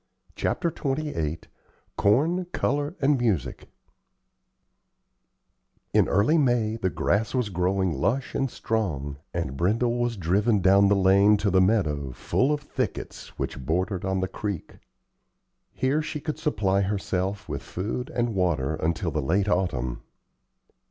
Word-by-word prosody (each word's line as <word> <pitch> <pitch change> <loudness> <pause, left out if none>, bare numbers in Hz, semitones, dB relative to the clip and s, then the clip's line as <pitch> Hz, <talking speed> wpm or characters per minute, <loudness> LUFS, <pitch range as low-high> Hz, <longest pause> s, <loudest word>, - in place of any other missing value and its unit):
CHAPTER 170 - 0
XXVIII 135 - -2 0.5
CORN, 155 - +2
COLOR, 145 +4 -1
AND 135 -2 +3
MUSIC 90 - -1 2.2
In - - +4
early 110 +12 +3
May 120 -5 +2
the 95 -4 0
grass 105 +6 0
was 125 -5 0
growing 95 0 0
lush 125 - -1
and 135 -1 0
strong, 80 - -2
and 80 -6 -3
Brindle 115 - +1
was 120 -2 -1
driven 100 +5 +2
down 100 +2 +5
the 100 - +4
lane 100 +2 +5
to 100 -1 0
the 95 0 +4
meadow, 75 - +1
full 130 - 0
of 150 -1 0
thickets, 130 -5 -5
which 65 - -4
bordered 90 - -1
on 95 0 0
the 95 - 0
creek. 100 -1 -5 0.9
Here 135 +4 0
she 150 0 -4
could 155 +1 -4
supply 100 - +1
herself 100 0 -2
with 70 -3 -4
food 110 +7 -4
and 120 -1 -1
water 85 -7 0
until 80 +1 -1
the 75 - -1
late 95 +9 +1
autumn. 65 -11 -1
100 Hz, 135 wpm, -26 LUFS, 90-120 Hz, 2.2 s, down